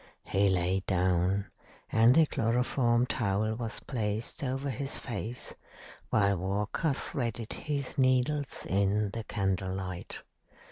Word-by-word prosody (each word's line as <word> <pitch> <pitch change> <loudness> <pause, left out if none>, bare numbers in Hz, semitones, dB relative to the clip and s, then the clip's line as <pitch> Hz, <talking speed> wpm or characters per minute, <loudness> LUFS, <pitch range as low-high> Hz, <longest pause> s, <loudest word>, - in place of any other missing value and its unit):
He 100 +1 +2
lay 90 +1 +2
down, 95 +1 +2 0.5
and 115 +3 +6
the 160 - +7
chloroform 120 -1 +2
towel 110 -2 0
was 115 -1 -4
placed 110 -1 -3
over 135 +1 -1
his 135 +3 -2
face, 120 -1 -4 0.6
while 100 -3 +3
Walker 100 - 0
threaded 115 -4 -3
his 140 -2 -3
needles 130 +2 +2
in 100 +1 +1
the 115 +2 -4
candle 95 -2 -1
light. 90 -2 -6
110 Hz, 120 wpm, -30 LUFS, 95-125 Hz, 0.6 s, the